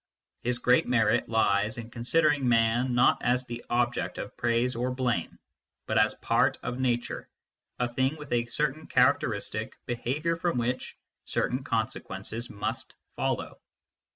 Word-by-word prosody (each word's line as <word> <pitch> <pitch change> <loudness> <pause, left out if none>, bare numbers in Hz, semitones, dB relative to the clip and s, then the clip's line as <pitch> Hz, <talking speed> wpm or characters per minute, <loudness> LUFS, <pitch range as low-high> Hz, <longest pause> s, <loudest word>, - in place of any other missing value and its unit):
His 125 0 0
great 125 0 +3
merit 115 -3 +2
lies 105 -1 +2
in 115 0 -7
considering 145 +2 +2
man 120 +2 +3
not 120 - +4
as 125 +1 +1
the 120 -1 -7
object 120 0 0
of - - -6
praise 120 +1 +1
or 125 +2 -1
blame, 125 -2 -1 0.5
but - - +2
as - - +3
a - - -25
part - - +2
of 125 - -3
nature, 120 -2 -1 0.5
a 125 - +1
thing 130 +4 0
with 150 -4 -6
a 120 0 +1
certain 150 +4 -2
characteristic 115 -4 +1
behaviour 140 +8 -1
from 170 -5 0
which 125 +1 -2 0.3
certain 130 +2 -1
consequences 110 -1 -3
must 110 +4 -4 0.2
follow. - - -2
120 Hz, 145 wpm, -28 LUFS, 115-130 Hz, 0.5 s, not